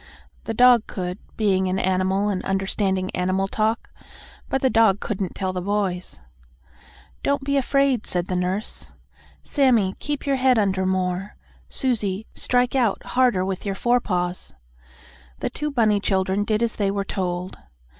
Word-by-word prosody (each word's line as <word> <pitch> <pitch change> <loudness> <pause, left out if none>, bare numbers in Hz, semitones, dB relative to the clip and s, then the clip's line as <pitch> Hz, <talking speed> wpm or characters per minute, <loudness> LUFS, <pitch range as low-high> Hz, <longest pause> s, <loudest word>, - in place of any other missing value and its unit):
The 225 - -3
dog 245 -2 +6
could, 180 +1 -4 0.2
being 190 -3 +2
an 185 +1 0
animal 190 +2 +1
and 190 -3 -2
understanding 190 -1 -1
animal 185 +2 0
talk, 220 +3 -1 0.6
but 270 - -1
the 260 - +4
dog 220 -3 +4
couldn't 195 -4 -3
tell 190 -1 -2
the 180 - -3
boys. 190 - -2 1.0
"Don't 280 -1 0
be 280 +1 0
afraid," 275 -3 +2
said 175 -1 -1
the 185 - -3
nurse. 185 +4 -3 0.5
"Sammie, 240 -9 +2
keep 295 -1 -3
your 275 -1 +1
head 255 -1 +4
under 190 -3 +1
more. 185 +1 -1 0.3
Susie, 215 -5 -1
strike 245 0 +1
out 235 -6 +1
harder 245 -8 +2
with 190 -1 -3
your 195 -1 -2
forepaws." 185 -7 0 0.9
The - - -3
two 300 0 -3
bunny 220 -7 +2
children 190 0 0
did 215 +1 +1
as 230 - -1
they 200 -2 +1
were 200 0 -2
told. 180 -1 -3
200 Hz, 150 wpm, -23 LUFS, 185-240 Hz, 1.0 s, dog